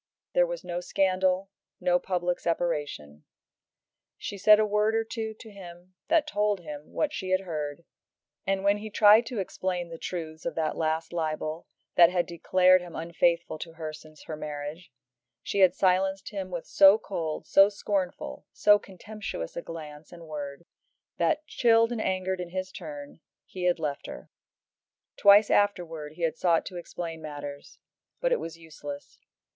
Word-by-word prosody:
There - - +4
was - - -5
no 175 0 -3
scandal, 185 +1 +1 0.3
no 180 -1 +2
public 180 -1 -1
separation. 145 - -2 0.9
She - - -6
said 210 +2 +6
a 215 - +4
word 210 +1 +1
or 225 - +2
two 220 -1 -5
to 220 0 -13
him 180 -2 -12
that 320 -2 +3
told 210 -8 0
him 150 -2 -9
what 300 -1 -1
she 190 -8 -4
had 185 0 +2
heard, 155 -3 -5 0.6
and 195 0 -1
when 200 +1 +3
he 215 +1 -7
tried 215 +2 +6
to 240 - -5
explain 185 -2 -3
the 165 -1 -8
truths 160 -3 -5
of - - -3
that 155 -2 -1
last 160 +1 -1
libel 155 -1 -3 0.3
that 170 -1 +9
had 180 -1 +1
declared 185 +2 +4
him 175 -2 -10
unfaithful 170 0 0
to 165 0 -7
her 160 -1 -6
since 155 0 -14
her 155 - -6
marriage, 150 +3 -6 0.5
she 200 - -2
had 185 -2 +6
silenced 190 +1 +1
him 195 -3 -5
with 175 -2 -5
so 195 +2 +7
cold, 165 -7 -4
so 195 +1 +6
scornful, 200 -3 -3
so 205 0 +5
contemptuous 195 - -7
a - - -3
glance 155 -2 -9
and 170 -1 -11
word, 145 0 -6 0.5
that, 310 -1 +1
chilled 230 -4 +3
and 235 -2 -2
angered 185 -1 -1
in 175 - -6
his 185 +1 -4
turn, 145 -4 -9 0.3
he 180 -1 -5
had 180 -1 +3
left 150 -3 -4
her. - - -10 0.8
Twice 205 +1 +6
afterwards 165 -7 0
he 170 - -6
had 165 0 0
sought 170 -2 +2
to 180 - -7
explain 165 -1 -6
matters, 145 -2 -8 0.4
but - - 0
it - - +3
was 165 0 -7
useless. 150 -3 -9
180 Hz, 165 wpm, -28 LUFS, 160-200 Hz, 0.9 s, that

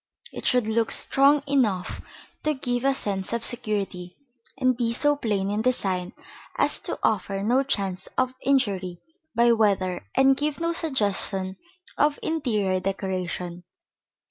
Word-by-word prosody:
It - - -4
should 250 -4 +3
look 225 0 +1
strong 280 +1 +4
enough 230 -10 0 0.4
to 305 0 0
give 245 -2 -2
a 275 0 +3
sense 195 -3 -2
of 235 -1 -1
security, 200 -7 -3 0.4
and 255 -2 +2
be 235 -1 0
so 290 +4 +2
plain 205 -7 -1
in 210 +1 0
design 190 -7 0 0.4
as - - +1
to - - -4
offer 195 -2 0
no 245 +5 +3
chance 195 -8 -2
of 255 0 +1
injury 195 -10 0 0.4
by 235 +1 +5
weather 195 -5 +1
and 270 0 +5
give 295 +2 -2
no 335 0 0
suggestion 200 - 0 0.4
of 295 0 +3
interior 215 -12 0
decoration. 185 -2 -3
220 Hz, 140 wpm, -25 LUFS, 190-265 Hz, 0.4 s, by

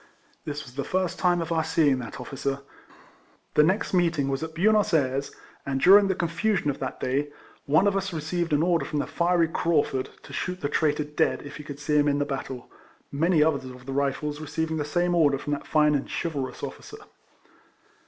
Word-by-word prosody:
This 150 0 -4
was 125 -3 -13
the 140 +1 -3
first 185 -1 -1
time 175 -1 +2
of 165 - -7
our 160 -1 +2
seeing 155 -4 +2
that 115 - -7
officer. 140 0 -3 0.9
The - - +5
next 185 +9 +1
meeting 170 -6 +2
was 135 0 -2
at 160 -1 -6
Buenos 210 +1 +3
Ayres, 135 -1 0 0.3
and 135 -1 -2
during 200 +6 +7
the 190 - 0
confusion 175 -1 0
of 140 - -9
that 130 - -4
day 140 +3 -1 0.4
one 155 +7 +4
of 200 -1 +2
us 195 0 -1
received 170 +1 -2
an 150 +1 +3
order 170 -1 +2
from 150 - -4
the 145 - 0
fiery 170 -1 +2
Craufurd 150 -5 0
to - - -12
shoot 180 0 -3
the 145 - -1
traitor 150 0 +1
dead 150 0 0
if 145 - -9
he 150 - -9
could 145 -1 -8
see 150 +1 0
him 145 0 +4
in 145 0 +2
the 145 - 0
battle, 135 -2 -5 0.4
many 160 +2 +3
others 145 -4 0
of 125 -1 -10
the 135 - -5
Eifles 145 +2 -1
receiving 160 +1 -2
the 150 - -2
same 175 +3 0
order 150 -5 +3
from 145 +2 -3
that 145 - -5
fine 150 -1 +3
and 140 -2 -1
chivalrous 145 -6 -4
officer. - - -7
150 Hz, 205 wpm, -26 LUFS, 140-170 Hz, 0.9 s, during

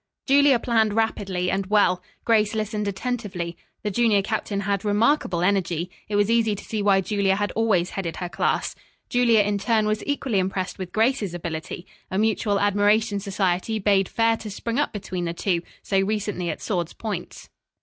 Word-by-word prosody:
Julia 280 -1 +5
planned 225 -3 +1
rapidly 195 -5 0
and 195 0 -1
well. 200 -3 +3 0.2
Grace 215 -2 +3
listened 215 -1 -2
attentively. 200 -5 -3 0.3
The 210 - -1
junior 215 -2 +3
captain 205 -1 -2
had 200 -1 -1
remarkable 205 - +2
energy. 180 -3 0 0.2
It 210 - -1
was 205 0 +3
easy 225 -2 +2
to - - -9
see 215 -2 -3
why 200 -1 +4
Julia 195 -1 +1
had 205 +1 -1
always 200 -6 +1
headed 175 -4 -4
her 180 - -4
class. - - -1 0.4
Julia 235 -3 +4
in 205 0 0
turn, 220 +1 +2
was 215 0 -1
equally 270 -7 0
impressed 185 0 -2
with 185 -2 -5
Grace's 220 -4 +1
ability. 170 +1 -5 0.2
A 190 - -2
mutual 210 -1 +1
admiration 205 +1 +2
society 195 +1 -1
bade 195 -2 +2
fair 225 0 +2
to 220 - -7
spring 230 +5 -3
up 295 - +1
between 185 -4 -4
the 170 0 -3
two, 175 -1 0 0.2
so 195 - +1
recently 200 -3 -1
at 155 - -5
swords' 175 -5 -2
points. 205 -6 -6
205 Hz, 175 wpm, -24 LUFS, 190-220 Hz, 0.4 s, Julia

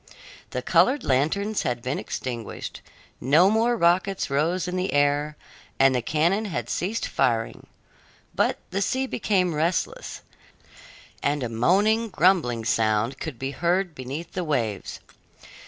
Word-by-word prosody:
The - - -4
colored 275 +3 +3
lanterns 180 +11 +1
had 120 -1 -2
been 130 +3 -2
extinguished, 120 -3 -6 0.4
no 165 +9 +4
more 230 +2 +2
rockets 180 -2 +1
rose 165 +6 0
in 180 - -3
the 185 +1 -1
air, 145 +1 +1 0.4
and 135 0 +5
the 125 - 0
cannon 170 - +1
had 120 - -4
ceased 205 +6 -2
firing; 115 -2 -1 0.7
but - - +1
the 195 +2 -1
sea 260 +7 0
became 190 -8 0
restless, 165 +3 -2 1.0
and 145 -1 0
a 120 - -2
moaning, 205 - +2
grumbling 155 - +2
sound 110 +4 +1
could 155 -7 -6
be 135 +3 -4
heard 175 +3 0
beneath 145 +5 -6
the 185 - -3
waves. 120 - -2
155 Hz, 135 wpm, -25 LUFS, 130-190 Hz, 1.0 s, and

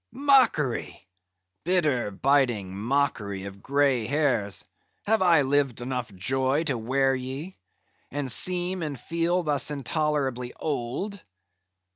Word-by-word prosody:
mockery! 245 - +2 0.6
bitter, 155 - +1
biting 120 -4 +1
mockery 110 -4 -1
of 100 0 -9
grey 135 -4 +1
hairs, 125 -8 0 0.4
have 220 0 +1
I 170 -5 +5
lived 135 -2 +1
enough 125 -2 -4
joy 130 - +1
to 145 -5 -1
wear 135 +4 +1
ye; 135 +8 -5 0.5
and 140 -2 -2
seem 180 +6 +2
and 145 -5 -4
feel 170 +4 0
thus 145 -3 +2
intolerably 140 -4 -1
old? 155 - -4
140 Hz, 110 wpm, -26 LUFS, 120-155 Hz, 0.6 s, I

